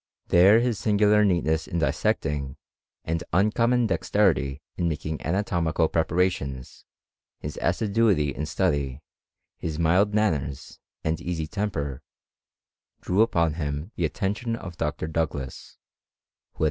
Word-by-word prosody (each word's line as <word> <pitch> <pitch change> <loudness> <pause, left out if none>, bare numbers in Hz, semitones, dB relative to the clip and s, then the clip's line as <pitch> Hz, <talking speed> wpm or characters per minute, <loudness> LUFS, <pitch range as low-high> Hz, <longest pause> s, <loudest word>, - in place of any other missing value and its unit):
There 95 +6 +6
his 120 -5 0
singular 105 +2 +4
neatness 85 -5 +1
in 85 - -3
dissecting, 70 -2 -1 0.5
and 80 +1 -1
uncommon 115 +5 +3
dexterity 80 -9 +1
in 85 - 0
making 75 0 -4
anatomical 85 -2 0
preparations, 80 -6 -1 0.5
his - - -6
assi 100 +4 0
duity 95 - +3
in 75 +3 -4
study, 70 -1 -1 0.5
his 80 -2 -4
mild 90 +5 +3
manners, 75 -11 -1 0.2
and 80 +1 -1
easy 85 -3 -3
temper, 75 - -3 1.0
drew 95 +4 +1
upon 85 -8 +2
him 75 +6 -3
the 85 - 0
attention 105 +7 -2
of 90 -6 -8
Dr. - - -2
Douglas, 80 -5 -4 0.8
who - - -45
at - - -33
VOL. - - -20
85 Hz, 125 wpm, -25 LUFS, 75-105 Hz, 1.0 s, There